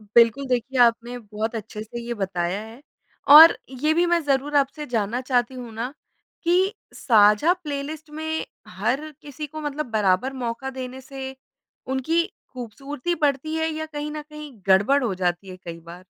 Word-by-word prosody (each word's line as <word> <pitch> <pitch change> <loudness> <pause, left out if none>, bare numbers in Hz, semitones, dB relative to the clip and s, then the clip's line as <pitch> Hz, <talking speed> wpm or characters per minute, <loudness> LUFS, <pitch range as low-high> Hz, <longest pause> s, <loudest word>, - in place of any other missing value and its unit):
बिल्कुल, 235 +4 +5
देखिए 255 +1 -1
आपने 235 +1 +3
बहुत 215 +1 -4
अच्छे 215 0 -6
से 230 +2 -7
ये 235 0 -4
बताया 190 -2 -2
है। 225 +5 -12 0.5
और 320 +2 +11 0.3
ये 310 - +4
भी 345 - +3
मैं 345 0 +3
ज़रूर 285 +1 +1
आपसे 285 +2 0
जानना 230 +1 -1
चाहती 250 -1 0
हूँ 245 -3 -8
ना 240 +4 -4 0.5
कि 370 +4 +3 0.2
साझा 215 +7 +5
प्लेलिस्ट 300 +1 -5
में 315 +1 -5 0.4
हर 245 +11 -2
किसी 295 +1 -7
को 310 +2 -8
मतलब 295 0 -3
बराबर 210 +4 +2
मौका 240 +3 -3
देने 255 +1 -6
से 265 0 -7 0.5
उनकी 265 +6 +1 0.3
ख़ूबसूरती 275 +6 -4
बढ़ती 290 +2 +1
है 320 0 0
या 315 0 -4
कहीं 300 -1 -5
न 305 -1 -5
कहीं 300 -1 -10
गड़बड़ 205 +9 +4
हो 215 -5 0
जाती 180 +1 -2
है 185 - -8
कई 170 -2 -9
बार? 170 +2 -12
260 Hz, 165 wpm, -24 LUFS, 220-295 Hz, 0.5 s, और